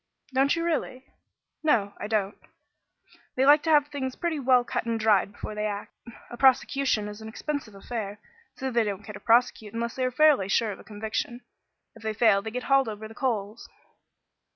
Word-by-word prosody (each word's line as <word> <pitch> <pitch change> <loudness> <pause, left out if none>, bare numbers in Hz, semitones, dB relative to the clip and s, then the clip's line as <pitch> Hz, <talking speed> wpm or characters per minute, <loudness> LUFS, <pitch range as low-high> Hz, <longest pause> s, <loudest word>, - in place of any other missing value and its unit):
"Don't 270 +3 +3
you 335 - -2
really?" 265 -6 -2 0.6
"No, 225 -10 +2
I 205 - -4
don't. 210 -2 0 1.0
They 260 - +2
like 290 +1 +7
to 325 - -3
have 295 -2 +4
things 265 -3 -4
pretty 335 -3 -2
well 255 -2 +4
cut 235 - -3
and 230 -1 -1
dried 210 -3 +3
before 205 - -7
they 210 0 -2
act. 205 -1 -6 0.4
A 240 - -7
prosecution 265 -4 +3
is 210 +1 -8
an 220 - -8
expensive 235 -1 -5
affair, 205 0 -5 0.4
so 265 -1 -4
they 235 -1 +2
don't 205 -1 -4
care 210 - -9
to 205 - -9
prosecute 230 -2 +2
unless 235 0 -2
they 260 - -2
are - - +1
fairly 275 -6 +4
sure 215 +2 +1
of - - -8
a - - -13
conviction. 220 +3 -4 0.5
If - - -15
they 220 -1 -3
fail 210 -3 +4
they 220 - -5
get 250 +3 -5
hauled 275 -3 +3
over 215 0 -7
the 220 - -12
coals." 225 -3 -3
230 Hz, 200 wpm, -27 LUFS, 210-265 Hz, 1.0 s, like